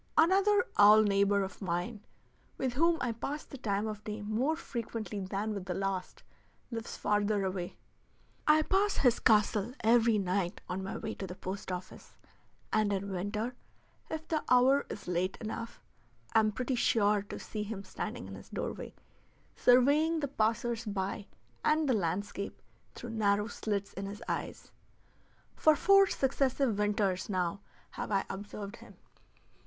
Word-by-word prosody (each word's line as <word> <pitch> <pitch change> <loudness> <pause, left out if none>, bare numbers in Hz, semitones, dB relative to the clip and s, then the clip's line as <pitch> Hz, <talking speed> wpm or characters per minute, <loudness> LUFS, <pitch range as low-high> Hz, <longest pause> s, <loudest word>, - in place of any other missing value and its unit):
Another 390 +4 +5
owl 210 +1 +8
neighbor 200 0 +3
of 190 - -7
mine, 190 +4 -3 0.5
with 260 -2 -1
whom 330 +5 +3
I 245 - 0
pass 275 +6 -4
the 275 - -10
time 205 -3 -1
of 215 -1 -5
day 210 0 -5
more 235 +9 0
frequently 230 - -5
than 200 +3 -2
with 200 -3 -5
the 180 -2 -3
last, 195 -2 -3 0.5
lives 230 -1 -5
farther 205 -1 +1
away. 185 -2 -4 0.7
I 310 +1 +6
pass 395 +4 +2
his 245 -3 +3
castle 215 +1 +3
every 230 0 +5
night 185 -2 -1
on 185 +1 -3
my 190 - -4
way 220 0 -4
to 190 - -6
the 180 - -7
post 190 +1 -5
office, 180 +1 -8 0.6
and 215 -1 +3
in 200 0 -2
winter, 210 +6 -2 0.6
if 315 0 -5
the 315 -2 -1
hour 260 +3 +5
is 205 - -7
late 180 +2 -1
enough, 230 +1 -6 0.5
am 215 -1 +4
pretty 255 +4 -2
sure 210 -4 +3
to 200 - -8
see 215 - -5
him 210 -1 -5
standing 185 - -5
in - - -8
his - - -11
doorway, - - -5 0.6
surveying 290 +6 +4
the 285 - -1
passers 230 -1 0
by 200 -1 -3 0.4
and 305 0 +3
the 260 - +3
landscape 200 +1 -2 0.4
through 240 - -7
narrow 205 -2 +2
slits 205 -3 -3
in 195 +1 -5
his 205 +1 -7
eyes. - - -4 0.8
For 310 -1 +5
four 395 +5 +6
successive 265 - +1
winters 205 -2 0
now 185 -1 -1 0.3
have - - -5
I 195 -1 +1
observed 205 +1 -7
him. - - -14
215 Hz, 155 wpm, -31 LUFS, 200-250 Hz, 0.8 s, owl